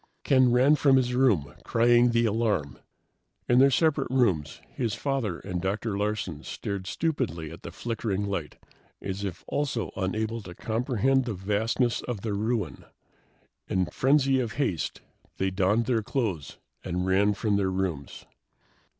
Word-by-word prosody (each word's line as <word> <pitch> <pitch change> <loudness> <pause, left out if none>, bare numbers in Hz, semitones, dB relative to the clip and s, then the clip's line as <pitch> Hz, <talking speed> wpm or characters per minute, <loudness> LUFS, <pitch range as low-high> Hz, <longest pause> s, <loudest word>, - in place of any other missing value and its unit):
Ken 130 -3 +4
ran 130 +4 +5
from 140 -2 +4
his 125 -2 +2
room, 120 - +2
crying 120 +1 +4
the 115 0 +2
alarm. 105 - 0 0.7
In 120 - +4
their 135 +1 +7
separate 155 +2 +2
rooms, 95 - +1
his 115 -5 -2
father 130 -11 -2
and 90 -3 -5
Dr. 100 +3 -2
Larsen 100 -6 -2
stared 100 +2 -5
stupidly 105 - -2
at 85 - -11
the - - -7
flickering 105 0 -3
light 95 -7 -4 0.4
as 95 +1 -5
if 95 -3 -5
also 135 -5 -2
unable 110 +4 -2
to 90 -3 -10
comprehend 125 +4 +1
the 115 -4 -3
vastness 110 +5 0
of 120 -6 -5
the 110 -1 -2
ruin. 105 - -2 0.8
In 95 -1 +1
frenzy 135 -1 +3
of 120 -4 -2
haste, 100 - -2 0.4
they 95 0 0
donned 100 +5 +2
their 115 -1 +1
clothes 110 - -3 0.3
and 90 0 -2
ran 100 +2 +3
from 105 +1 0
their 95 -2 +1
rooms. 95 -7 -3
110 Hz, 150 wpm, -27 LUFS, 95-125 Hz, 0.8 s, their